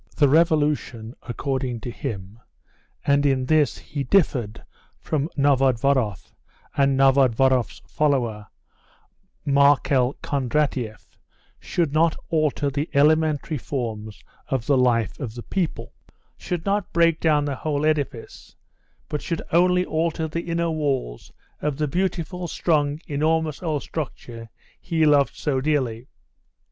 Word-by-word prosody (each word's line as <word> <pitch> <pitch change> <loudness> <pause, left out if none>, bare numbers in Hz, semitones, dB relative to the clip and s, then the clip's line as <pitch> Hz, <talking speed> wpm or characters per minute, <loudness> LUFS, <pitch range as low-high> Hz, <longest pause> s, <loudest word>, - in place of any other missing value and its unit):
The 145 - +5
revolution, 150 -7 +1
according 130 -1 -3
to 120 - -5
him, 100 -1 -6 0.7
and 140 0 +3
in 135 -2 +1
this 155 -2 +2
he 140 -1 -5
differed 125 - +1 0.4
from 155 0 -2
Novodvoroff 135 -5 +1 0.4
and 135 -1 +2
Novodvoroff's 130 -2 +3
follower, 120 -8 0 1.0
Markel 140 -2 +3
Kondratieff, 130 -6 -2 0.4
should 165 -5 -1
not 160 +1 +3 0.2
alter 150 -3 +1
the 145 +3 -2
elementary 155 0 +2
forms 110 -6 -5 0.2
of 130 -4 -2
the 140 - +3
life 120 -4 +1
of 120 -6 -5
the 120 - -7
people, 185 -5 -3 0.4
should 175 -2 -4
not 200 -1 -1
break 165 -1 +3
down 150 -3 +2
the 140 -2 -3
whole 150 -1 -1
edifice, 145 -6 -3 0.5
but 150 - -3
should 165 -3 -3
only 180 +2 +3
alter 160 0 -1
the 170 +2 -5
inner 170 0 0
walls 135 - -2 0.3
of 150 -2 -1
the 150 0 0
beautiful, 180 +1 -2
strong, 150 -3 0
enormous 155 +1 0
old 155 -5 -2
structure 120 -6 -6 0.3
he 160 -2 0
loved 145 -2 +3
so 135 -3 -1
dearly. 130 -5 -1
145 Hz, 120 wpm, -23 LUFS, 130-155 Hz, 1.0 s, The